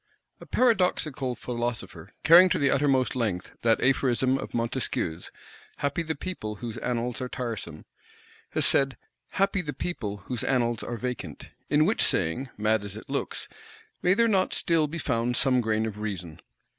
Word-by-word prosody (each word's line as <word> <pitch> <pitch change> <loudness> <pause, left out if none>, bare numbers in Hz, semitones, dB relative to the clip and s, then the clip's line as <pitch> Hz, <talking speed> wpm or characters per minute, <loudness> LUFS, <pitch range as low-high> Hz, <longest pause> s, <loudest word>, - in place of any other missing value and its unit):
A - - -12
paradoxical 180 - +1
philosopher, 115 -9 -4
carrying 175 +3 +8
to - - +1
the 140 -1 +3
uttermost 135 -3 +2
length 105 -8 -2
that 115 -1 +3
aphorism 130 -1 +2
of - - -6
Montesquieu's, 115 -8 -2 0.5
"Happy 145 +4 -1
the 160 -1 -3
people 140 -11 -5
whose 115 +1 -6
annals 120 +1 -2
are 125 - -3
tiresome," 120 -5 -5 0.7
has - - +3
said, 135 -3 +3 0.4
"Happy 195 0 +2
the 150 -4 -5
people 105 - -4
whose 125 -4 -3
annals 120 -3 +1
are 120 - -4
vacant." 120 - -5 0.2
In 150 +1 +4
which 210 +6 +1
saying, 95 +11 +1
mad 105 0 +1
as 100 0 -6
it - - -10
looks, - - -3 0.5
may 180 +1 +4
there 230 +1 +4
not 195 -4 +2
still 165 -3 +2
be 160 +3 -5
found 120 -4 0
some 130 -2 +3
grain 110 -1 0
of 105 -2 -5
reason? 90 -7 -5
125 Hz, 160 wpm, -27 LUFS, 110-145 Hz, 0.7 s, carrying